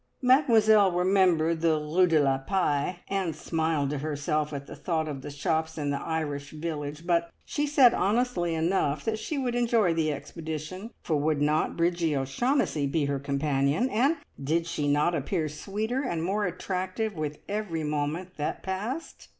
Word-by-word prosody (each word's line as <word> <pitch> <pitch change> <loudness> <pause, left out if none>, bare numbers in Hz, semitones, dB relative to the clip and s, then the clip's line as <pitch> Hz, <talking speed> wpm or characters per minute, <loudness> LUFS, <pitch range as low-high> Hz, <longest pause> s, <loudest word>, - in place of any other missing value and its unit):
Mademoiselle 220 -7 +5
remembered 175 -3 +2
the 165 -2 +3
Rue 160 +5 +2
de 160 -2 +4
la 135 -2 +2
Paix, 170 0 0
and 190 -5 -1
smiled 160 -3 -1
to 150 - -2
herself 150 +1 -1
at 140 -1 -5
the - - -9
thought 160 -3 -1
of 140 -3 -5
the 145 - -7
shops 160 +2 -1
in 145 -2 -1
the 140 - -2
Irish 145 -3 -3
village, 155 0 -5
but 170 -1 +1 0.2
she 295 0 -1
said 270 -5 +6
honestly 200 -5 +1
enough 160 -3 0
that 220 -1 -1
she 285 +7 -3
would 255 -3 -1
enjoy 230 -7 +2
the 160 -2 +1
expedition; 160 +6 -6
for 155 - 0
would 150 0 +1
not 150 +1 +1
Bridgie 170 -3 +1
O'Shaughnessy 145 - 0
be 145 +1 0
her 140 -1 -1
companion, 140 - 0
and 275 +9 +2 0.3
did 165 +4 +1
she 150 -3 -2
not 150 +4 +2
appear 160 +2 -1
sweeter 210 - -3
and 170 - -2
more 200 +3 0
attractive 185 +4 -3
with 150 -3 -4
every 200 -6 -2
moment 150 +5 -3
that 150 - -3
passed? 215 +12 -5
165 Hz, 165 wpm, -27 LUFS, 150-195 Hz, 0.3 s, said